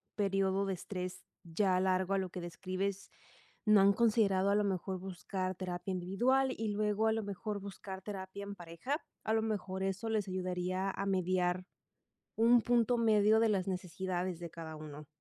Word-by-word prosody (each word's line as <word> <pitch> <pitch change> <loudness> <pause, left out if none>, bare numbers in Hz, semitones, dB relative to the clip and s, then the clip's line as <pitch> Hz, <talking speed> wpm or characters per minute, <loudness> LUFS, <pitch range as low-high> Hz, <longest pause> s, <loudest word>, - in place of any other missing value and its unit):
período 195 -1 +1
de 195 - -1
estrés 185 0 -5 0.2
ya 185 +2 +1
largo 185 0 +1
a - - +3
lo 190 -1 -1
que 180 - -6
describes, 185 +3 -3 0.6
no 215 -2 +7
han 200 +1 +6
considerado 200 -4 +3
a - - +3
lo 210 - +3
mejor 190 -1 -2
buscar 185 0 -4
terapia 180 +1 -4
individual 240 +9 +2
y 225 - -2
luego 210 +1 +1
a - - +4
lo 220 0 0
mejor 205 +1 -4
buscar 195 -1 -7
terapia 195 -1 -6
en 200 0 -6
pareja, 175 - -3 0.3
a 220 - 0
lo 220 - +3
mejor 195 -4 -2
eso 195 +3 -2
les 215 -2 0
ayudaría 185 +1 -1
a 195 - -3
mediar 185 -1 +1 0.7
un 235 +2 +6
punto 240 +1 +3
medio 220 -1 +5
de 225 - +4
las 195 -4 +1
necesidades 180 -1 -3
de 170 -1 -6
cada 160 -1 -8
uno. 150 -1 -9
195 Hz, 175 wpm, -34 LUFS, 185-210 Hz, 0.7 s, no